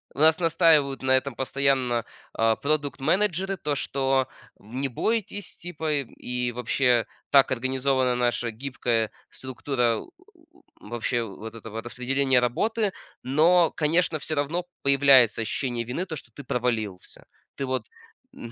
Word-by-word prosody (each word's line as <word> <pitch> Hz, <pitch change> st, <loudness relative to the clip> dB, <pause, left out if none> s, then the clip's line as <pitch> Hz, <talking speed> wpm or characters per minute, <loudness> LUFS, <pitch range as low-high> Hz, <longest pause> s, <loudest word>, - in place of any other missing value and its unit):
нас 160 Hz, +3 st, +5 dB
настаивают 155 Hz, -5 st, +3 dB
на 130 Hz, -, +1 dB
этом 130 Hz, 0 st, +2 dB
постоянно, 130 Hz, -3 st, 0 dB, 0.3 s
а, 115 Hz, 0 st, +2 dB
продукт-менеджеры, 170 Hz, -, 0 dB
то, 150 Hz, -2 st, -2 dB
что: 135 Hz, -1 st, 0 dB, 0.3 s
"Не 130 Hz, +6 st, -4 dB
бойтесь, 205 Hz, -, -2 dB
типа". 160 Hz, -3 st, -4 dB
И 125 Hz, -3 st, -3 dB
вообще 125 Hz, -1 st, +2 dB, 0.3 s
так 140 Hz, -2 st, +6 dB
организована 130 Hz, 0 st, +1 dB
наша 120 Hz, -1 st, 0 dB
гибкая 120 Hz, -2 st, -1 dB, 0.2 s
структура, 130 Hz, -3 st, -1 dB
э, -, -, -8 dB
э, -, -, -19 dB, 0.7 s
вообще 120 Hz, +2 st, -2 dB
вот 110 Hz, +2 st, -8 dB
этого 115 Hz, 0 st, -7 dB
распределения 130 Hz, +2 st, +1 dB
работы. 205 Hz, -, 0 dB, 0.3 s
Но, 165 Hz, +6 st, +4 dB
конечно, 160 Hz, +1 st, +1 dB
всё 155 Hz, +1 st, -4 dB
равно 155 Hz, +5 st, -1 dB, 0.2 s
появляется 135 Hz, -5 st, +5 dB
ощущение 120 Hz, +1 st, -2 dB
вины, 125 Hz, +10 st, -3 dB
то, 165 Hz, -4 st, -6 dB
что -, -, -10 dB
ты 145 Hz, -, -10 dB
провалился. 110 Hz, -7 st, -3 dB, 0.3 s
Ты 135 Hz, -, -3 dB
вот 130 Hz, -3 st, -2 dB, 0.5 s
м, 115 Hz, -, -9 dB
135 Hz, 130 wpm, -25 LUFS, 120-150 Hz, 0.7 s, так